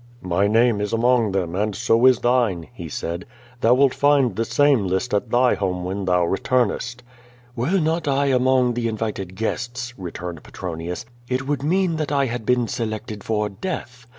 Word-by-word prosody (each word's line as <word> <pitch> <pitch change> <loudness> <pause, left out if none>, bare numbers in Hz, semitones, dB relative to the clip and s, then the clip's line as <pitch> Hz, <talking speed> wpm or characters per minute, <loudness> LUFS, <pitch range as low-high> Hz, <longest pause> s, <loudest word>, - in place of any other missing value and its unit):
"My 90 +2 +1
name 115 0 +3
is 105 +1 -2
among 115 -2 +3
them, 90 -3 -2
and 105 +1 -1
so 115 +3 +3
is 130 -2 +6
thine," 120 -10 +1
he - - -8
said. 85 +2 -4 0.4
"Thou 120 +2 +4
wilt 135 0 +4
find 140 -7 +3
the 115 +3 -1
same 125 -3 +3
list 95 +7 -1
at 105 +3 0
thy 125 +2 +4
home 90 -2 -2
when 95 +1 -3
ihou 90 -1 +3
retumest.'^ 120 +4 0 0.5
"Were 145 +11 +1
not 160 0 0
I 140 0 +2
among 130 -2 +3
the 120 -1 -1
invited 105 -4 -4
guests," 120 +3 -3
returned 85 -2 -6
Petro 90 -3 -6
nius, 85 +6 -5 0.2
"it 130 +1 -1
would 145 -1 -1
mean 170 +2 +1
that 155 -2 -2
I 140 -1 +2
had 120 -3 -4
been 125 -1 +2
selected 110 -2 -4
for 105 -1 0
death. 125 - -6
115 Hz, 180 wpm, -22 LUFS, 100-130 Hz, 0.5 s, is